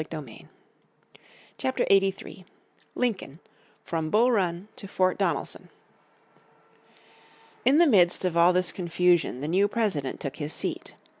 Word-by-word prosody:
__________ 145 Hz, -9 st, -9 dB, 1.1 s
Chapter 130 Hz, -, -1 dB
83 195 Hz, -1 st, 0 dB, 0.5 s
Lincoln 205 Hz, -, -2 dB, 0.5 s
From 160 Hz, -2 st, -3 dB
Bull 235 Hz, +7 st, +3 dB
Run 185 Hz, -3 st, -1 dB
to 200 Hz, -, -9 dB
Fort 185 Hz, -1 st, 0 dB
Donelson -, -, -2 dB, 2.0 s
IN 275 Hz, +3 st, +5 dB
the 340 Hz, -, +6 dB
midst 185 Hz, -, +3 dB
of 180 Hz, -2 st, -1 dB
all 170 Hz, +1 st, +5 dB
this 180 Hz, 0 st, +1 dB
confusion 175 Hz, -6 st, +1 dB
the 145 Hz, -, -3 dB
new 190 Hz, +5 st, +2 dB
President 200 Hz, -, -2 dB
took 140 Hz, 0 st, -6 dB
his 150 Hz, -1 st, -4 dB
seat. -, -, -4 dB
180 Hz, 125 wpm, -26 LUFS, 160-200 Hz, 2.0 s, the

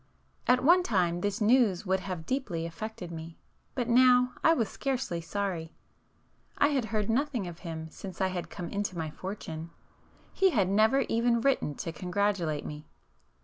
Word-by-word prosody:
At 250 Hz, 0 st, +4 dB
one 350 Hz, +6 st, +6 dB
time 175 Hz, -, +1 dB
this 205 Hz, +3 st, -1 dB
news 220 Hz, -4 st, +3 dB
would 190 Hz, 0 st, +1 dB
have 185 Hz, -4 st, -5 dB
deeply 200 Hz, -11 st, -2 dB
affected 180 Hz, +1 st, -6 dB
me, 165 Hz, 0 st, -8 dB, 0.4 s
but 245 Hz, -3 st, -1 dB
now, 250 Hz, +1 st, +5 dB
I 325 Hz, -, +6 dB
was 230 Hz, -7 st, +1 dB
scarcely 260 Hz, -11 st, -2 dB
sorry. 170 Hz, -2 st, -3 dB, 0.8 s
I 285 Hz, -, +4 dB
had 270 Hz, -5 st, 0 dB
heard 215 Hz, -2 st, -1 dB
nothing 250 Hz, -2 st, 0 dB
of 170 Hz, -1 st, -8 dB
him 160 Hz, -2 st, -6 dB
since 190 Hz, 0 st, -9 dB
I 190 Hz, -, +2 dB
had 180 Hz, -2 st, -4 dB
come 180 Hz, -3 st, -6 dB
into 200 Hz, -3 st, -3 dB
my 160 Hz, -2 st, -3 dB
fortune,—he 170 Hz, -, -4 dB
had 200 Hz, -, +2 dB
never 220 Hz, +7 st, +4 dB
even 235 Hz, -1 st, +2 dB
written 240 Hz, -, +1 dB
to 165 Hz, -, -4 dB
congratulate 180 Hz, -2 st, -1 dB
me. 150 Hz, 0 st, -7 dB
200 Hz, 160 wpm, -29 LUFS, 170-245 Hz, 0.8 s, one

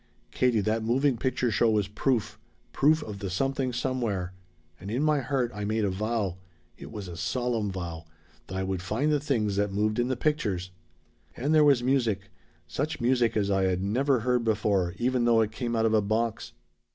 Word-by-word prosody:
"Katie, 125 Hz, -4 st, +2 dB
that 110 Hz, +3 st, 0 dB
moving 130 Hz, +4 st, +2 dB
picture 125 Hz, 0 st, 0 dB
show 115 Hz, -, +3 dB
was 105 Hz, -2 st, +1 dB
proof. 115 Hz, +3 st, -1 dB, 0.3 s
Proof 155 Hz, +2 st, +3 dB
of 105 Hz, -2 st, -7 dB
the 95 Hz, -, -4 dB
Something 135 Hz, +6 st, -1 dB
Somewhere. 115 Hz, -8 st, -2 dB, 0.5 s
And 95 Hz, -, -8 dB
in 125 Hz, +7 st, 0 dB
my 155 Hz, -1 st, +3 dB
heart 130 Hz, -2 st, -1 dB
I 105 Hz, -, -5 dB
made 110 Hz, +1 st, 0 dB
a 100 Hz, -, 0 dB
vow 105 Hz, -2 st, -2 dB, 0.4 s
it -, -, -11 dB
was 100 Hz, -3 st, -6 dB
a 85 Hz, -, -7 dB
solemn 115 Hz, +1 st, -1 dB
vow 85 Hz, -3 st, -6 dB, 0.4 s
that 95 Hz, -, -6 dB
I 95 Hz, -, -1 dB
would 95 Hz, -1 st, -2 dB
find 115 Hz, +11 st, 0 dB
the 150 Hz, -, +2 dB
things 110 Hz, -9 st, 0 dB
that 100 Hz, 0 st, +1 dB
moved 105 Hz, +3 st, 0 dB
in 120 Hz, -, +2 dB
the 130 Hz, -1 st, -1 dB
pictures. 100 Hz, -, -1 dB, 0.7 s
"And 145 Hz, +5 st, 0 dB
there 155 Hz, -1 st, +6 dB
was 140 Hz, -5 st, +4 dB
music 115 Hz, -7 st, 0 dB, 0.3 s
such 145 Hz, -, -3 dB
music 120 Hz, -2 st, +2 dB
as 100 Hz, -1 st, +1 dB
I 95 Hz, -1 st, +2 dB
had 95 Hz, 0 st, 0 dB
never 125 Hz, +5 st, +1 dB
heard 125 Hz, 0 st, +1 dB
before, 100 Hz, -5 st, +1 dB
even 125 Hz, 0 st, +1 dB
though 115 Hz, -1 st, +5 dB
it 110 Hz, -1 st, 0 dB
came 120 Hz, +1 st, -3 dB
out 115 Hz, 0 st, +2 dB
of 110 Hz, -, +2 dB
a 110 Hz, -, +4 dB
box. 110 Hz, +2 st, -1 dB
115 Hz, 200 wpm, -27 LUFS, 100-130 Hz, 0.7 s, there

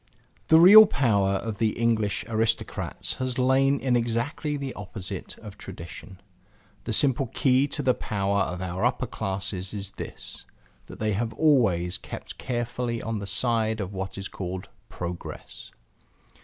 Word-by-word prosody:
The 160 Hz, -, +7 dB
real 205 Hz, +5 st, +10 dB
power 100 Hz, -, +2 dB
of 105 Hz, +1 st, -3 dB
the 110 Hz, -2 st, +1 dB
English 110 Hz, -3 st, +1 dB
aristocrats 115 Hz, 0 st, -1 dB
has 130 Hz, -1 st, -2 dB
lain 135 Hz, +2 st, +3 dB
in 125 Hz, -2 st, +1 dB
exactly 120 Hz, +6 st, -1 dB
the 140 Hz, -2 st, -4 dB
opposite 95 Hz, -1 st, -7 dB
of 105 Hz, -2 st, -11 dB
tradition. 95 Hz, +1 st, -9 dB, 0.7 s
The 115 Hz, -, -3 dB
simple 135 Hz, +3 st, +2 dB
key 130 Hz, +1 st, +2 dB
to 145 Hz, 0 st, -3 dB
the 130 Hz, -, +4 dB
power 100 Hz, -3 st, -1 dB
of 90 Hz, +2 st, -2 dB
our 95 Hz, +2 st, -3 dB
upper 125 Hz, +1 st, +1 dB
classes 95 Hz, -3 st, -4 dB
is 100 Hz, -1 st, -3 dB
this: -, -, -9 dB, 0.4 s
that -, -, -10 dB
they 110 Hz, -1 st, 0 dB
have 115 Hz, +3 st, -2 dB
always 100 Hz, -, +2 dB
kept -, -, -9 dB
carefully 120 Hz, -1 st, -2 dB
on 115 Hz, -1 st, -3 dB
the 100 Hz, -, -6 dB
side 110 Hz, +1 st, 0 dB
of 100 Hz, -1 st, -4 dB
what 95 Hz, 0 st, -5 dB
is 100 Hz, 0 st, -4 dB
called 95 Hz, 0 st, -6 dB, 0.2 s
Progress. 90 Hz, 0 st, -7 dB
110 Hz, 150 wpm, -26 LUFS, 95-125 Hz, 0.7 s, real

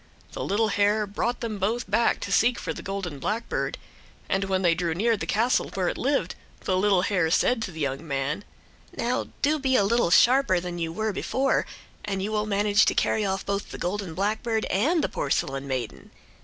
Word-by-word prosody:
The -, -, -5 dB
little 215 Hz, +2 st, +1 dB
hare 205 Hz, +1 st, +2 dB
brought 235 Hz, +4 st, -2 dB
them 220 Hz, -4 st, -3 dB
both 225 Hz, +6 st, -1 dB
back 220 Hz, +4 st, +2 dB
to 200 Hz, -, -4 dB
seek 240 Hz, +4 st, +3 dB
for -, -, -4 dB
the -, -, -8 dB
golden 190 Hz, -7 st, -5 dB
blackbird, 220 Hz, -, -2 dB, 0.5 s
and 195 Hz, +1 st, 0 dB
when 190 Hz, -1 st, 0 dB
they 170 Hz, -2 st, +4 dB
drew 170 Hz, -1 st, -1 dB
near 225 Hz, +5 st, +2 dB
the 205 Hz, -, -5 dB
castle 235 Hz, +4 st, +1 dB
where 185 Hz, -2 st, +1 dB
it -, -, -3 dB
lived 265 Hz, -9 st, 0 dB, 0.3 s
the 185 Hz, -, 0 dB
little 190 Hz, -1 st, +3 dB
hare 185 Hz, -5 st, +1 dB
said 225 Hz, +7 st, +2 dB
to 195 Hz, -, -3 dB
the 160 Hz, -1 st, -7 dB
young 140 Hz, +3 st, -2 dB
man: 140 Hz, +6 st, -2 dB, 0.5 s
"Now, -, -, -1 dB, 0.2 s
do 300 Hz, +2 st, +3 dB
be 265 Hz, -2 st, +1 dB
a 205 Hz, -, +4 dB
little 230 Hz, -1 st, +2 dB
sharper 240 Hz, -1 st, +5 dB
than 175 Hz, 0 st, -5 dB
you 165 Hz, -1 st, -2 dB
were 220 Hz, +4 st, -2 dB
before, 270 Hz, +7 st, 0 dB, 0.4 s
and 195 Hz, -2 st, -2 dB
you 210 Hz, -, -2 dB
will 210 Hz, 0 st, 0 dB
manage 205 Hz, 0 st, +3 dB
to -, -, +1 dB
carry 220 Hz, -, +1 dB
off 195 Hz, -1 st, -2 dB
both 200 Hz, 0 st, -2 dB
the -, -, -7 dB
golden 185 Hz, -2 st, -3 dB
blackbird 220 Hz, +3 st, -1 dB
and 300 Hz, -, +2 dB
the -, -, +2 dB
porcelain 135 Hz, 0 st, -2 dB
maiden. 120 Hz, -, -4 dB
200 Hz, 205 wpm, -26 LUFS, 180-220 Hz, 0.5 s, sharper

